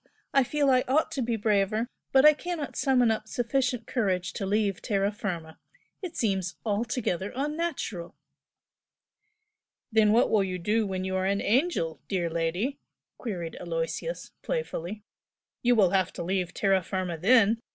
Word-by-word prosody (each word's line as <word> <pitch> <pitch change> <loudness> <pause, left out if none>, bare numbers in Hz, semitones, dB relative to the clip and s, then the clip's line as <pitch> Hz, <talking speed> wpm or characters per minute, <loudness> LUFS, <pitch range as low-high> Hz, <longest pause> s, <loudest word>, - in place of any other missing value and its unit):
I 275 - +5
feel 285 +1 +1
I 255 -1 +4
ought 310 +5 +2
to 285 -4 -2
be 235 -1 0
braver 215 +1 +1 0.2
but 265 +1 +6
I 305 - +9
cannot 325 -1 -5
summon 250 -4 +3
up 215 0 -2
sufficient 250 +1 -1
courage 185 -7 -1
to 195 - -3
leave 205 -2 0
terra 200 -2 0
firma. 170 -6 -5 0.4
It 365 -4 -6
seems 190 -5 0
altogether 210 -3 -1
unnatural." 290 - -3 1.8
"Then 215 -1 +4
what 230 +3 +4
will 210 -3 +4
you 185 -1 -3
do 210 +5 +1
when 185 -1 -3
you 190 0 -2
are 185 0 0
an 200 +1 +1
angel, 205 - +1
dear 175 -4 -1
lady?" 175 - -1 0.4
queried 175 -8 -4
Aloysius, 170 - -3
playfully 210 - -4 0.6
"You 245 0 +4
will 195 -5 +4
have 190 -3 +2
to - - -5
leave 180 0 -1
terra 195 -1 +2
firma 185 -1 -3
then! 225 +5 +4
210 Hz, 150 wpm, -28 LUFS, 185-250 Hz, 1.8 s, I